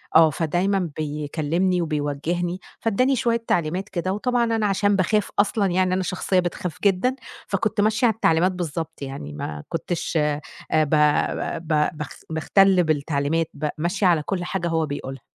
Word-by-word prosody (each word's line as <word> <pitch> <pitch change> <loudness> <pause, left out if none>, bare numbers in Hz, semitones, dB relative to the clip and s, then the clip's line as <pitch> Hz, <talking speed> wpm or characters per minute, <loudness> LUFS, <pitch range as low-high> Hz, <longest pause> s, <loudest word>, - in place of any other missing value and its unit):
آه 160 0 +8
فدايمًا 175 +4 0
بيكلّمني 155 +4 -1
وبيوجّهني، 165 +3 -2 0.2
فإدّاني 255 +5 +2
شوية 235 -1 0
تعليمات 175 +4 0
كده، 185 +1 -2
وطبعًا 245 +4 +1
أنا 225 -2 +1
عشان 205 0 +2
باخاف 200 +2 +1
أصلًا 205 0 +2
يعني 185 0 +2
أنا 185 0 0
شخصيّة 185 0 0
بتخاف 175 -1 -3
جدًا، 200 +6 +2 0.3
فكنت 205 +1 0
ماشية 215 +3 +2
على 225 - +2
التعليمات 175 -3 +3
بالضبط، 165 -3 -5
يعني 135 - -6
ما 75 0 -5
كنتش 165 0 -2
آآ 150 -1 +1 0.3
ب 155 -2 +3 0.8
ب 150 -1 +2
باخ 150 -2 -5 0.2
باختلّ 185 +4 +4
بالتعليمات، 155 +1 0
ب 150 +1 -2
ماشية 175 +5 +1
على 165 -4 +3
كلّ 180 +2 -2
حاجة 175 -1 -2
هو 165 -1 +1
بيقولها. 135 -2 -6
175 Hz, 150 wpm, -23 LUFS, 155-195 Hz, 0.8 s, آه